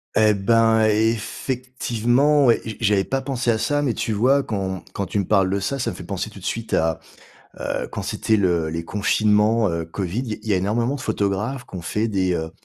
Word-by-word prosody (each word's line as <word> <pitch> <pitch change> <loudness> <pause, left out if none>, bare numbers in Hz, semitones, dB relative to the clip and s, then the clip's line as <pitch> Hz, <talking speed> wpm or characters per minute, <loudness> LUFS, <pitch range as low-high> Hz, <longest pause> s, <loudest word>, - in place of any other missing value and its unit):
Et 110 -1 +4
ben, 110 +2 +3
effectivement 120 +4 +1
et - - +1
et - - -5
je - - -7
j'avais 100 -2 +3
pas 135 +6 -2
pensé 130 -3 -2
à 110 - +1
ça. 145 +7 0
Mais, 130 -5 0
tu 110 - -2
vois, 130 +6 +3
quand 95 -4 -3
quand 100 - -2
tu 105 - -3
me 100 - -1
parles 95 -2 +3
de 100 - 0
ça, 135 +8 -2
ça 125 - -1
me - - -9
fait - - -9
penser 95 +3 -4
tout 105 - -12
de 90 - -11
suite 115 0 -3
à, 80 -1 +1 0.6
heu, - - -3
quand - - -5
c'était 110 - 0
le 85 -5 +1
les 85 +1 -4
confinements, 105 +2 +2
heu, 85 -1 -2
COVID. 90 +5 -3
Il 125 -4 -4
y - - -11
il 110 - -8
y - - +2
a 95 - +3
énormément 115 +7 0
de 145 - -6
photographes 105 +5 -2
qu'ont 95 -6 -8
fait 105 +6 -1
des, 95 -4 0
heu, 80 -1 -3
110 Hz, 230 wpm, -22 LUFS, 95-120 Hz, 0.6 s, Et